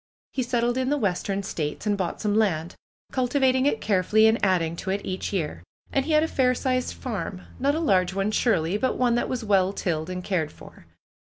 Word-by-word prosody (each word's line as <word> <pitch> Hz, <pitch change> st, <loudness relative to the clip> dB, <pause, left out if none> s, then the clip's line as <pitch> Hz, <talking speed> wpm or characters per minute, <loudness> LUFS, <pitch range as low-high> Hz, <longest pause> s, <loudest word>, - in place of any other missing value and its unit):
He 265 Hz, -, -1 dB
settled 240 Hz, 0 st, 0 dB
in 260 Hz, 0 st, 0 dB
the 295 Hz, -, +2 dB
Western 200 Hz, -3 st, -1 dB
states, 155 Hz, -2 st, -4 dB
and 210 Hz, -1 st, +2 dB
bought 185 Hz, -3 st, -3 dB
some 210 Hz, -2 st, 0 dB
land, 180 Hz, -7 st, +1 dB, 0.4 s
cultivating 260 Hz, +1 st, +2 dB
it 225 Hz, -, 0 dB
carefully 210 Hz, +2 st, +3 dB
and 220 Hz, +1 st, +3 dB
adding 170 Hz, -4 st, +2 dB
to 190 Hz, -, -5 dB
it 200 Hz, +1 st, -2 dB
each 185 Hz, 0 st, -3 dB
year. 155 Hz, -, -2 dB, 0.3 s
And 270 Hz, -1 st, +1 dB
he 315 Hz, -, 0 dB
had 305 Hz, 0 st, +5 dB
a -, -, +1 dB
fair 255 Hz, -4 st, +2 dB
sized 255 Hz, -1 st, -1 dB
farm, 195 Hz, -6 st, -5 dB, 0.2 s
not 280 Hz, +3 st, +2 dB
a -, -, 0 dB
large 190 Hz, -, +2 dB
one, 195 Hz, +2 st, 0 dB
surely, 200 Hz, -6 st, +1 dB
but 260 Hz, +4 st, 0 dB
one 245 Hz, -2 st, +2 dB
that 240 Hz, -, 0 dB
was 250 Hz, -2 st, -2 dB
well 195 Hz, -2 st, +3 dB
tilled 160 Hz, -4 st, -2 dB
and 180 Hz, 0 st, -4 dB
cared 165 Hz, -6 st, -1 dB
for. -, -, -15 dB
210 Hz, 215 wpm, -25 LUFS, 185-255 Hz, 0.4 s, had